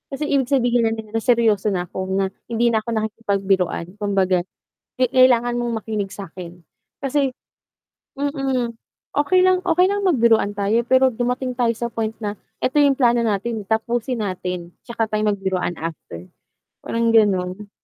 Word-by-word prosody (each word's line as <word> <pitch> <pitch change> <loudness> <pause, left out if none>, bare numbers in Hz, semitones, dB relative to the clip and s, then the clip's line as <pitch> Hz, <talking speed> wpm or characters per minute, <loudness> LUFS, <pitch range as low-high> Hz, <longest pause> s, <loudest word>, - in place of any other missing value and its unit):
Kasi 300 +2 -3
ibig 270 -3 +2
sabihin 245 -3 +3
no'n 220 -1 -6
na 225 - 0
seryoso 225 -4 +2
na 175 - -1
ako, 190 0 -4
na 195 -1 0 0.2
hindi 235 0 +1
na 220 - +2
ako 215 - -8
nakikipagbiruan, 195 -5 -1
kumbaga 195 -3 +1 0.6
ke 255 - +4
kailangan 245 -2 +4
mong 240 -2 -1
makinig 210 -3 -3
sa'kin. 175 -3 -9 0.3
Kasi 275 0 0 0.8
mm, 270 -4 -1 0.5
okey 365 +5 +3
lang 370 0 +4
okey 350 +1 +4
lang 405 0 0
magbiruan 230 - +3
tayo 205 +3 +1
pero 260 +1 +4
dumating 250 +2 -2
tayo 235 -2 +2
sa 235 +1 -4
point 225 -1 -3
na, 205 -1 -4 0.2
'eto 265 +4 +2
'yong 285 -2 +4
plano 240 -3 +3
natin, 215 0 -2
tapusin 230 +2 -1
natin, 180 -2 -4 0.2
'tsaka 230 -2 -2
tayo 215 0 0
magbiruan 190 -3 -1
after. 120 - -8 0.5
Parang 230 0 0
gano'n. 200 -2 +2
225 Hz, 150 wpm, -21 LUFS, 200-250 Hz, 0.8 s, ke